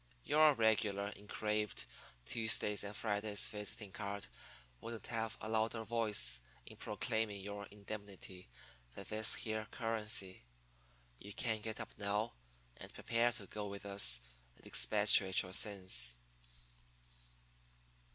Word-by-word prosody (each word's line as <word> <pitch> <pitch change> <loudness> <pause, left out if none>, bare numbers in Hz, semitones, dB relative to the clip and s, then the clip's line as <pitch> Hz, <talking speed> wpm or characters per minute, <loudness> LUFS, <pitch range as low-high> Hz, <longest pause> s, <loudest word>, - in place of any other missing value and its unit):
'Your 155 -1 +6
regular 110 -3 +2
engraved 105 0 -2 0.4
Tuesdays 110 -2 +2
and 100 +1 -6
Fridays 105 -1 +2
visiting 105 -1 -5
card 100 0 -4 0.5
wouldn't 115 - -7
have 115 -1 -3
a - - -6
louder 110 +1 0
voice 105 - +1 0.2
in - - -12
proclaiming 110 -2 -2
your 100 +1 -6
indemnity 100 - -9 0.5
than - - -7
this 110 +1 +3
here 110 -1 -3
currency. 110 -4 +1 0.8
You 100 +1 -9
can 110 -2 0
get 110 0 -4
up - - -6
now 105 +2 -1 0.4
and - - -9
prepare 115 +1 +1
to 105 -4 -5
go 105 +2 -5
with 100 0 -7
us 80 -12 +2 0.4
and - - -18
expatriate 100 -2 +5
your 90 0 -8
sins.' 95 - +1
105 Hz, 120 wpm, -37 LUFS, 100-110 Hz, 0.8 s, Your